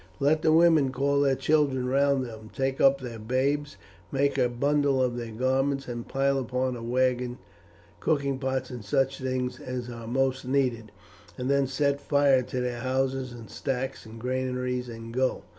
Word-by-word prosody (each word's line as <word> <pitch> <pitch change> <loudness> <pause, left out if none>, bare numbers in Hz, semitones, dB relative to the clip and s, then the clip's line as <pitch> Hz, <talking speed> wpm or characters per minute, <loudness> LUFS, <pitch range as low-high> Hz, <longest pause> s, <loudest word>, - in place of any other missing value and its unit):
Let 150 +3 +3
the 155 - +3
women 160 -4 +5
call 140 +2 +1
their 135 -1 +3
children 135 -2 +1
round 135 0 +2
them, 110 -2 -10
take 135 0 -1
up 135 0 +5
their 120 -3 -7
babes, 140 +6 -1 0.3
make 140 +1 +1
a 125 -2 +2
bundle 140 +2 +1
of 125 -2 +1
their 120 -1 -5
garments, 135 +4 0
and 120 -1 -5
pile 135 0 +1
upon 130 0 -1
a 120 - -7
wagon 125 +1 0 0.6
cooking 140 - 0
pots 130 -1 -2
and 120 -3 -7
such 135 +6 0
things 130 -1 -2
as 125 -1 -5
are 115 -1 -8
most 130 +2 0
needed, 125 -5 0 0.5
and 130 +1 -1
then 140 -1 +3
set 140 +1 0
fire 140 -3 +4
to 125 0 -4
their 125 -1 -2
houses 130 0 -1
and 115 -2 -10
stacks 135 0 -3
and 110 +1 -10
granaries 125 0 -2
and 115 0 -8
go. 130 +1 0
130 Hz, 175 wpm, -27 LUFS, 125-140 Hz, 0.6 s, women